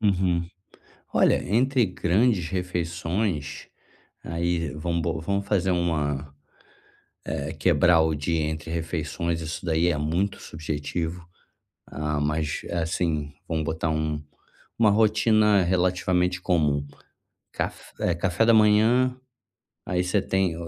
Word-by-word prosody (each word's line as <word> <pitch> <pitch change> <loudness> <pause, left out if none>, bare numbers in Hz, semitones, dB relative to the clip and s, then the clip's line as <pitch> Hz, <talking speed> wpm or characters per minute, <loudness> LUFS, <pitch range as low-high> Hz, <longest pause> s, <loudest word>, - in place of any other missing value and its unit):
Uhum, 90 -4 +1 0.7
olha - - +3
entre 125 +4 +2
grandes 95 0 +1
refeições, 90 -3 -2 0.6
aí 85 -1 -1
vamos 85 +2 -2
bo 80 0 -2
vamos 100 +4 -2
fazer 95 -2 +1
uma, 75 -5 -1 0.9
eh 70 +3 -3
quebrar 85 +1 +4
o 80 0 +2
dia 80 +3 -1
entre 80 +1 -3
refeições, 85 0 -2
isso 80 +2 -5
daí 80 +1 +2
é 80 -4 +1
muito 85 +7 -1
subjetivo. 80 +2 -4 0.6
Ah, 75 0 -3
mas, 75 +1 -1
eh, 85 - -4
assim 80 -3 -1
vamos 80 -1 -1
botar 80 0 -1
um 80 -1 -1 0.6
uma 110 -2 +5
rotina 105 -1 +4
relativamente 90 0 +1
comum, 75 -6 +1 0.7
caf - - -5
eh 90 - +1
café 90 +4 +1
da 115 - +6
manhã, 110 +4 +4 0.7
aí 90 -1 0
você 95 +2 +1
tem 95 -4 0
85 Hz, 120 wpm, -25 LUFS, 80-95 Hz, 0.9 s, da